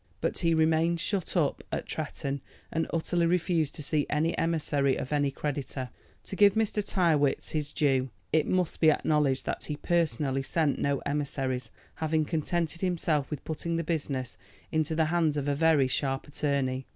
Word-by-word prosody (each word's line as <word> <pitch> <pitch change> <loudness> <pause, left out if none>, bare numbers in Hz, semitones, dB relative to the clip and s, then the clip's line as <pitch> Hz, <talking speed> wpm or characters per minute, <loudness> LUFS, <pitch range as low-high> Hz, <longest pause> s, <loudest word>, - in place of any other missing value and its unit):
But - - -1
he 165 -2 +2
remained 160 +1 +3
shut 190 0 -2
up - - +1
at - - -2
Tretton, 140 0 -4 0.3
and 165 0 0
utterly 170 +1 +1
refused 170 -3 +1
to 150 - -7
see 150 0 0
any 155 +3 +1
emissary 145 -4 +1
of 130 - -4
any 145 -1 +2
creditor. 135 -2 -4 0.3
To - - -7
give 205 0 +6
Mr. 220 -1 +1
Tyrrwhit 160 -9 +2
his 150 -2 -2
due, 135 -3 +1 0.2
it 155 -1 +3
must 180 -3 0
be 160 - +7
acknowledged 150 -3 +2
that - - -3
he 150 - -3
personally 145 -5 0
sent 150 +1 0
no 140 -1 0
emissaries, 135 -3 -2 0.3
having 155 -1 +1
contented 165 +1 -1
himself 165 -6 0
with 150 - -6
putting 165 +1 -2
the 165 - 0
business 145 -6 -3 0.3
into 155 0 0
the 160 0 +3
hands 160 -4 +2
of 145 -1 -2
a 145 - +2
very 150 -2 +4
sharp 135 +1 -1
attorney. 140 -3 -1
155 Hz, 170 wpm, -29 LUFS, 140-165 Hz, 0.3 s, be